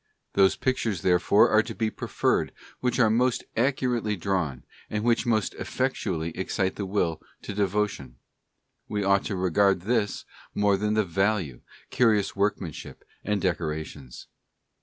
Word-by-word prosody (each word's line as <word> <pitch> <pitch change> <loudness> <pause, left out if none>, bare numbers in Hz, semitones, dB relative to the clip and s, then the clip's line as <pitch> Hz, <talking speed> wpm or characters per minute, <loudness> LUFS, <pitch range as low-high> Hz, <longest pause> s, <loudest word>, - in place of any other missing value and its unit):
Those 95 -1 +4
pic 130 0 0
tures 100 -8 -2
therefore 90 +3 +4
are 110 - +6
to 115 0 -7
be 110 -1 -1
preferred - - -1 0.3
which 125 -1 0
are 110 -4 +4
most 125 +2 +1
accurately 120 -3 0
drawn, 85 -8 -2 0.3
and 105 0 -2
which 120 0 +2
most 110 -3 +1
effectually 95 -11 -2
excite 95 0 -1
the 100 - -4
will 85 -5 -1 0.2
to - - -5
devo 105 +1 +1
tion; 65 -11 -10 0.7
we 105 -1 -2
ought 100 0 +2
to 105 - -2
regard 95 +1 +2
this 105 0 -1 0.3
more 100 -1 +3
than 105 +2 0
the 110 -1 +2
value, 95 - 0 0.3
curious 110 -5 +2
workmanship, 100 -5 -3 0.2
and 105 -1 -1
decorations. 80 -7 -3
100 Hz, 145 wpm, -26 LUFS, 90-110 Hz, 0.7 s, are